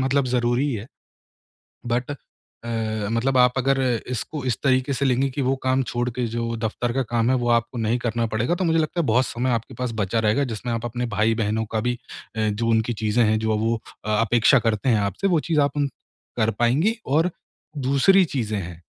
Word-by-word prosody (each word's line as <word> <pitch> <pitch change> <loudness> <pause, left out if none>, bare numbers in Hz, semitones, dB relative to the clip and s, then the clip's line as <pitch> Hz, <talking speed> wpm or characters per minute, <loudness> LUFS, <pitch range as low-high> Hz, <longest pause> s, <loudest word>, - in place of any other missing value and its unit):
मतलब 135 +1 +2
ज़रूरी 125 +3 +1
है। 110 +2 -6 1.0
बट 125 +3 -1
अ, 145 - -4 1.0
मतलब 130 +3 +1
आप 125 0 +5
अगर 135 +1 +2 0.3
इसको 130 +4 -4
इस 120 - +1
तरीके 130 +1 +2
से 140 - -1
लेंगी 135 +1 +2
कि 135 +2 -3
वो 135 +1 +1
काम 130 +1 +2
छोड़ 120 0 -2
के 125 - +1
जो 115 0 -3
दफ़्तर 115 +2 -2
का 135 - 0
काम 120 +1 +2
है 130 - +3
वो 120 - 0
आपको 115 +1 +1
नहीं 115 +2 +1
करना 115 -1 -1
पड़ेगा 120 +11 +1
तो 185 - -1
मुझे 165 -1 +2
लगता 160 +2 0
है 160 - 0
बहुत 120 +3 +3
समय 125 +3 -2
आपके 115 +1 -2
पास 125 -1 -3
बचा 110 +1 0
रहेगा, 110 +6 +2
जिसमें 120 0 -4
आप 115 0 -3
अपने 120 +1 -3
भाई-बहनों 110 0 0
का 110 - +1
भी 120 +2 0 0.4
अ, 110 -1 +1
जो 115 +3 -1
उनकी 110 +1 +2
चीज़ें 115 +2 +3
हैं 110 0 +2
जो 110 0 0
वो 115 +2 +1 0.3
अ, - - -1
अपेक्षा 120 +4 +4
करते 115 +3 0
हैं 110 - +3
आपसे 100 - -1
वो 170 -4 +3
चीज़ 155 -2 +4
आप 140 0 0
उन 145 -1 +1 0.5
कर 110 -1 +3
पाएँगी 155 - +2 0.2
और 165 +3 +3 0.6
दूसरी 185 +8 +5
चीज़ें 110 -9 -2
हैं 85 -2 -7
120 Hz, 210 wpm, -23 LUFS, 110-135 Hz, 1.0 s, आप